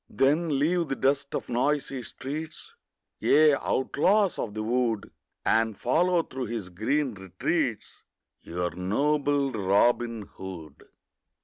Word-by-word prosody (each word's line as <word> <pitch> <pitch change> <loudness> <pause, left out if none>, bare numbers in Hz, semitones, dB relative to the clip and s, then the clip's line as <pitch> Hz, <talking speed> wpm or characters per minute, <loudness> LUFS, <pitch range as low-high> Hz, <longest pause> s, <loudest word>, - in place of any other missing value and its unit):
Then 150 +2 +2
leave 165 +4 +1
the 135 - -2
dust 140 +1 0
of - - -3
noisy 135 +2 0
streets, 155 - -7 0.5
Ye 155 0 +5
outlaws 185 +9 +1
of 105 -2 -4
the 110 - -2
wood, 115 -2 0 0.3
And 110 -2 +2
follow 170 +7 +2
through 130 -3 -5
his 110 -5 -5
green 125 +9 -1
retreats 95 -2 -3 0.4
Your 90 +1 -3
noble 140 - +1
Robin 115 +2 +2
Hood. 90 -6 -10
130 Hz, 115 wpm, -27 LUFS, 105-150 Hz, 0.5 s, Ye